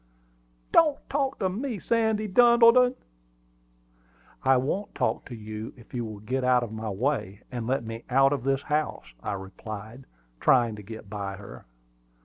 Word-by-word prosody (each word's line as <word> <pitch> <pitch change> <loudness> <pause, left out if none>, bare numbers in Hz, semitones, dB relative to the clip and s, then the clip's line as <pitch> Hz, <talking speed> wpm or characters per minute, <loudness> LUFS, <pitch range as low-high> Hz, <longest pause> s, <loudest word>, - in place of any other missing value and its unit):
"Don't 305 -4 +5
talk 275 -1 0
to 190 - 0
me, 225 +5 -3
Sandy 220 0 +1
Duddleton!" 240 +3 +6 1.5
"I 135 0 +5
won't 190 +11 -2
talk - - 0
to 125 - -8
you 110 0 -7
if 115 - -17
you 120 -1 -2
will 110 -2 -7
get 130 +5 -2
out 125 -1 +4
of 115 - -6
my 110 0 -4
way, 100 -2 -2
and 120 -3 -4
let 135 0 0
me 115 +1 -7
out 135 +2 +4
of 140 - -2
the 135 0 +2
house," 150 - -2
I - - -3
replied, 110 +5 -8 0.3
trying 120 -4 +4
to - - -8
get 110 +1 -9
by 100 -1 -4
her. 100 -9 -12
125 Hz, 160 wpm, -27 LUFS, -, 1.5 s, Duddleton